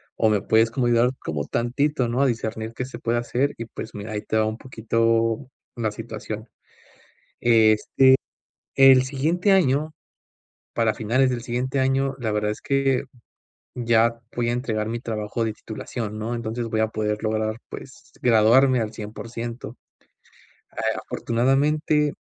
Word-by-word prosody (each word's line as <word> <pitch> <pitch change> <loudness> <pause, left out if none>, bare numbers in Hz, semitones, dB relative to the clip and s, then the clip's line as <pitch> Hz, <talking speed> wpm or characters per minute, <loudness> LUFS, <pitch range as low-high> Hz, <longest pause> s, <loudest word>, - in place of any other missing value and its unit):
o 110 - +2
me 105 -2 +2
puedes 110 +1 +3
como 125 0 0
ayudar 120 +1 +3
como 75 -2 -3
tantito, 125 +2 0
¿no?, 125 +3 0
a - - +4
discernir 110 -1 -3
que 125 - -4
se 130 - -9
puede 120 0 0
hacer 125 +4 -1
y, 115 - -5
pues, 110 - -8
mira, 105 +2 -6
ahí 105 - -3
te 110 - -1
va 110 - +3
un 110 0 -3
poquito 115 0 0 0.3
la 115 -3 -1
situación. 110 0 -7 0.9
Este, 110 +2 +4 0.7
el 135 -1 +8
siguiente 160 +9 0
año, 155 -4 +2 0.8
para 115 -2 +1
finales 130 +4 +1
del 120 -2 -3
siguiente 130 +3 -2
año, 135 +1 +1
la 115 - -1
verdad 105 0 0
es - - -9
que 135 -1 +1 0.7
ya 115 -1 +2 0.2
voy 120 -1 0
a - - 0
entregar 115 -4 -2
mi 115 +1 -3
trabajo 110 -1 -3
de 110 - -2
titulación, 110 0 -6
¿no? 115 +2 -3
Entonces, 115 0 -3
voy 110 0 0
a 110 - +1
poder 105 0 -2
lograr, 110 0 -1
pues, - - -11
graduarme 120 +2 +5
al 110 - -3
cien 105 0 -7
por 115 - -8
ciento, 115 0 -6 1.0
eh, - - -1
afortunadamente, 145 +5 +1
115 Hz, 160 wpm, -23 LUFS, 110-130 Hz, 1.0 s, el